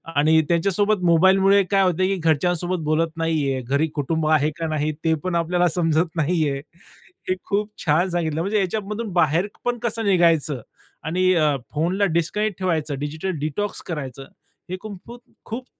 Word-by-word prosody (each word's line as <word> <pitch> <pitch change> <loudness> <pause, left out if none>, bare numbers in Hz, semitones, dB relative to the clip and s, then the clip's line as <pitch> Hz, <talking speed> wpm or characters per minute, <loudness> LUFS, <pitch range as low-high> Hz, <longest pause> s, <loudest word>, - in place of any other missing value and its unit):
आणि 160 +2 +4
त्यांच्यासोबत 200 +4 +1
मोबाईलमुळे 190 +4 +5
काय 195 -1 +4
होतंय 185 +1 +2
की 195 - 0
घरच्यांसोबत 175 +2 0
बोलत 155 +2 +1
नाहीये, 150 -5 0
घरी 140 +6 0
कुटुंब 155 +2 -1
आहे 155 -1 +3
का 165 -1 -2
नाही? 155 0 -1
ते 160 -1 +3
पण 185 -2 -2
आपल्याला 175 +1 +2
समजत 165 0 +1
नाहीये. 155 -3 0 0.7
हे 185 - +2
खूप 205 +1 -1 0.2
छान 165 +5 +2
सांगितलं 165 -2 -1
म्हणजे 205 +4 0
ह्याच्यामधून 210 +2 -2
बाहेर 170 +3 +2 0.2
पण 245 0 0
कसं 230 -2 -2
निघायचं 165 - +2 0.4
आणि 185 +3 +2
अ, 155 -4 +2 0.2
फोनला 180 +6 +1
डिस्कनेक्ट 200 +4 0
ठेवायचं, 160 -6 -1
डिजिटल 155 +6 -3
डिटॉक्स 155 +8 -3
करायचं. 135 -5 -5 0.5
हे 185 - -3
कुं 210 0 -8
फूत 240 +1 -10 0.3
खूप 245 +3 -6
170 Hz, 155 wpm, -22 LUFS, 155-190 Hz, 0.7 s, मोबाईलमुळे